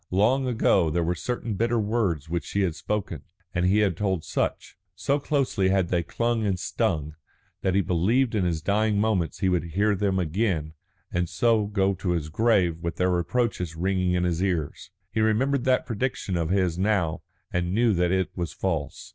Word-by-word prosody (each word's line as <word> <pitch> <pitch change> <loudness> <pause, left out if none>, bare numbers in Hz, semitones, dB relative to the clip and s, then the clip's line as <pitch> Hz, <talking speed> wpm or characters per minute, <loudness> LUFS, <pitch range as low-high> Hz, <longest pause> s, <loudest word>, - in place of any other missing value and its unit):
Long 120 +8 +2
ago 110 -8 +3
there 85 +2 0
were 85 +2 0
certain 115 +5 -3
bitter 115 +4 +1
words 100 -9 0
which 85 0 -2
she 100 - -1
had 90 -4 +1
spoken, 95 +4 -3 0.3
and 90 +1 +1
he 105 +3 +3
had 100 -5 +2
told 95 -3 -1
Sutch, - - -2 0.2
so 140 +8 0
closely 135 -10 +1
had 95 -2 +1
they 90 -1 +1
clung 115 +6 -1
and 95 -3 0
stung, 75 -4 -1 0.5
that 95 -1 0
he 100 - +4
believed 100 +9 +1
in 105 -4 +1
his 85 -3 -1
dying 105 +1 +1
moments 105 -6 0
he 95 - +2
would 90 -3 +1
hear 105 +1 +3
them 100 -1 0
again 85 -3 -1 0.4
and 85 -1 0
so 115 -3 +2
go 100 -1 +1
to 90 -1 -2
his 80 -3 -2
grave 90 -3 +2
with 85 -1 -4
her 90 0 +2
reproaches 90 -1 -1
ringing 90 +1 0
in 90 0 +1
his 90 -1 0
ears. 85 -6 -2 0.2
He 110 - 0
remembered 125 +5 +1
that 130 -1 +2
prediction 115 -4 -2
of 85 -2 -1
his 90 -2 +1
now 95 -6 +1 0.3
and 90 0 0
knew 115 +2 +3
that 90 -1 +1
it 95 0 0
was 85 -5 -3
false. 80 -7 -3
95 Hz, 190 wpm, -26 LUFS, 85-110 Hz, 0.5 s, he